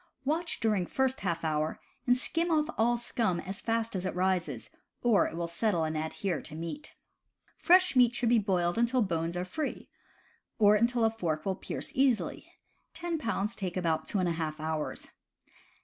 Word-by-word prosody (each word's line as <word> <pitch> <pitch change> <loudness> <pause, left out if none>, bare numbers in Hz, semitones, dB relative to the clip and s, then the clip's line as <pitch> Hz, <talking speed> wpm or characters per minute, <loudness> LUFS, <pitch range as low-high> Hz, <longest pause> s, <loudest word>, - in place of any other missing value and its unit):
Watch 330 +4 -1
during 210 -6 +1
first 265 0 0
half 170 -3 -2
hour, 155 0 -1 0.3
and 245 0 +5
skim 330 +6 0
off 310 0 +2
all 240 +2 +2
scum 225 -6 0
as 195 +3 -6
fast 225 -1 -1
as 185 - -2
it 185 - -3
rises, 180 -9 -1 0.3
or 235 -4 +4
it - - -7
will 170 0 -2
settle 170 +1 0
and 155 0 -2
adhere 160 +3 -2
to 155 - -10
meat. 170 - -6 0.6
Fresh 365 -2 +4
meat 245 -1 +5
should 240 -1 +1
be 235 -1 +5
boiled 180 -2 0
until 235 +1 +3
bones 170 -2 -2
are 180 - -2
free, 300 - -4 0.7
or 210 -1 +6
until 235 +2 +3
a 225 - +3
fork 165 -8 -2
will 195 - +1
pierce - - -6
easily 260 -4 +1 0.4
(ten 340 -2 -2
pounds 225 -4 -1
take 185 -5 -4
about 165 -3 0
two - - -1
and 185 -2 +1
a - - +1
half 160 -2 -3
hours). 155 -1 -3
200 Hz, 180 wpm, -30 LUFS, 170-240 Hz, 0.7 s, or